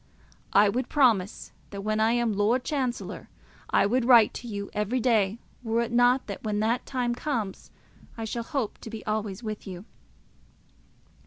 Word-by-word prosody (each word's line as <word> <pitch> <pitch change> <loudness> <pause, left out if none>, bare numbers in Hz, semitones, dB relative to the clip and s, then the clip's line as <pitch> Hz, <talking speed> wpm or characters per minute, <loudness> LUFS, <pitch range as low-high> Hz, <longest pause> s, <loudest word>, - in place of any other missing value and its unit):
I 205 +1 +6
would 245 +5 -1
promise 225 -10 +2 0.2
that 200 -1 -6
when 215 +1 0
I 220 +1 +3
am 240 -2 +1
Lord 215 +5 +2
Chancellor 260 -5 -3 0.4
I - - +3
would 245 +5 +1
write 235 -3 +6
to 240 - -7
you 200 -2 -5
every 210 +5 0
day, 220 -4 +2 0.2
were 230 -1 0
it 235 - -3
not 245 +2 +4
that - - -6
when 210 -2 -1
that 230 +3 0
time 250 -2 -1
comes 235 -7 -3 0.5
I 225 - -4
shall 235 +2 -3
hope 245 -2 -3
to - - -9
be 225 -1 -8
always 215 -1 -3
with 215 -2 -5
you. 185 +1 -8
225 Hz, 170 wpm, -27 LUFS, 210-245 Hz, 0.5 s, I